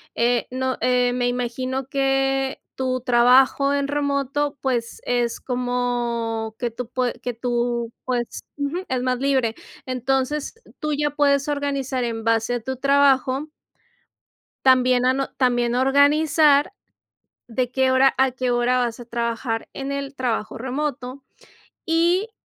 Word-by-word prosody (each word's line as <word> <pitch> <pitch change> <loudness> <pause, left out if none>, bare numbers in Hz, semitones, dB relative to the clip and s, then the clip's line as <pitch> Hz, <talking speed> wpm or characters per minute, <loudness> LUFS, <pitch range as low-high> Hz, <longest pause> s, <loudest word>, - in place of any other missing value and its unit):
eh, 240 0 +1
no 260 0 -2
eh, 250 0 +2
me 245 0 0
imagino 250 +2 -2
que 270 0 0
tu 255 -1 -2
trabajo 255 +3 +4
en 280 0 0
remoto, 285 0 -1
pues 240 -3 -2
es 240 -1 0
como 240 -3 -2
que 240 -1 -2
tú 230 +1 -7
pue 250 -1 -1
que 245 - -3
tú, 235 0 -2
pues, 245 -2 -3 0.2
ujú, 285 +4 -2
es 255 -1 0
más 255 -1 0
libre. 260 -4 +1 0.3
Entonces, 265 - -1 0.2
tú 305 -1 -2
ya 295 0 0
puedes 280 -1 +2
organizar 280 -3 -2
en 230 -1 -4
base 230 +1 +1
a - - -2
tu 265 +4 -4
trabajo. 275 +1 +2 1.2
También 255 -1 +4
ano 265 +1 +1
También 245 -2 +1
organizar 285 +3 +4 0.8
de 245 +1 -1
qué 265 0 +2
hora 265 +1 +4
a 265 -1 +3
qué 255 0 -2
hora 240 +1 +2
vas 240 -1 -2
a 240 - -10
trabajar 235 -1 -2
en 275 0 -5
el 280 0 -4
trabajo 235 -5 -2
remoto. 260 0 -4 0.6
Y 345 +6 +2
255 Hz, 135 wpm, -22 LUFS, 245-275 Hz, 1.2 s, trabajo